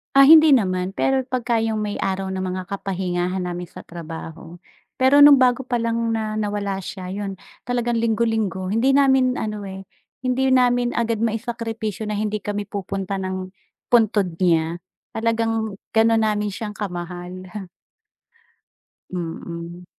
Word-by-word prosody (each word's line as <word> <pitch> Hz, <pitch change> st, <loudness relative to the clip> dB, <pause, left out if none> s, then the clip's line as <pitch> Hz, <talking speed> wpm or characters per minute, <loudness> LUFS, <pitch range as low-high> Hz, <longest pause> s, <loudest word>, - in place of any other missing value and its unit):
Ah, 275 Hz, 0 st, +8 dB
hindi 315 Hz, -1 st, +9 dB
naman, 185 Hz, -7 st, +2 dB
pero 265 Hz, +6 st, +1 dB
pagka 240 Hz, -3 st, -1 dB
'yong 220 Hz, -1 st, -1 dB
may 210 Hz, -1 st, -2 dB
araw 190 Hz, 0 st, -2 dB
ng 185 Hz, -, -2 dB
mga 185 Hz, 0 st, -4 dB
kapahingahan 185 Hz, -2 st, -2 dB
namin 175 Hz, 0 st, -4 dB
sa 175 Hz, -, -11 dB
trabaho, 165 Hz, 0 st, -9 dB, 0.4 s
pero 275 Hz, +3 st, +6 dB
nung 285 Hz, -2 st, +9 dB
bago 255 Hz, +1 st, +3 dB
pa 245 Hz, -1 st, -1 dB
lang 230 Hz, 0 st, -1 dB, 0.2 s
na 220 Hz, -1 st, -2 dB
nawala 205 Hz, -2 st, -2 dB
siya, 185 Hz, 0 st, -7 dB
yun, 195 Hz, 0 st, -5 dB, 0.2 s
talagang 240 Hz, -1 st, -1 dB
linggo-linggo, 225 Hz, -4 st, 0 dB
hindi 230 Hz, +7 st, +2 dB
namin 265 Hz, -2 st, +3 dB
ano 210 Hz, -1 st, -4 dB
eh, 190 Hz, -1 st, -8 dB, 0.3 s
hindi 260 Hz, +1 st, +1 dB
namin 245 Hz, -1 st, +3 dB
agad 230 Hz, -2 st, -1 dB
maisakripisyo 225 Hz, -2 st, -3 dB
na 205 Hz, -, -2 dB
hindi 215 Hz, -1 st, -2 dB
kami 205 Hz, -1 st, -3 dB
pupunta 195 Hz, -1 st, -4 dB
ng 185 Hz, 0 st, -4 dB, 0.3 s
puntod 210 Hz, -7 st, +2 dB
niya, 170 Hz, -1 st, +1 dB, 0.3 s
talagang 225 Hz, -2 st, -1 dB, 0.2 s
ganon 225 Hz, 0 st, +4 dB
namin 210 Hz, -1 st, -1 dB
siyang 210 Hz, +1 st, -6 dB
kamahal. 180 Hz, -1 st, -6 dB, 1.7 s
Mm. 170 Hz, 0 st, -6 dB
210 Hz, 140 wpm, -22 LUFS, 185-230 Hz, 1.7 s, hindi